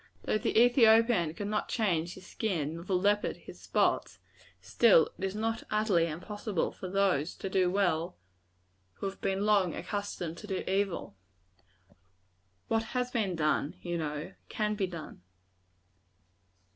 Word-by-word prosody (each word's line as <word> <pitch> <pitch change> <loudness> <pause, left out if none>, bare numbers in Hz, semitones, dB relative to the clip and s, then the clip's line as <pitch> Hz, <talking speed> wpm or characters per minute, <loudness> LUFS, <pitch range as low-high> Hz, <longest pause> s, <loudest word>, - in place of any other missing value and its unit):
Though 215 - 0
the 215 - +2
Ethiopian 230 - +5
cannot 210 +2 -2
change 175 -7 0
his 190 - -13
skin, 170 -9 -2
nor 170 +1 -8
the 185 - 0
leopard 205 +3 +1
his - - -13
spots, - - 0 0.4
still 165 - +4
it - - -7
is 195 +1 -2
not 225 +1 -1
utterly 210 -6 +2
impossible 200 +3 -3
for 185 - -8
those 185 -5 +1
to - - -5
do 185 -1 +3
well 175 - 0 0.8
who - - -7
have 195 0 -5
been 195 +1 0
long 200 -5 +3
accustomed 180 -3 -4
to 210 - -10
do 190 -2 -2
evil. 190 - -1 1.5
"What 225 0 +1 0.2
has 250 0 -1
been 205 -7 0
done," 150 -2 0
you 175 -1 -3
know, 150 +2 -4 0.2
"can 210 -1 -1
be 200 -2 -1
done." 165 - -9
195 Hz, 145 wpm, -30 LUFS, 170-210 Hz, 1.5 s, Ethiopian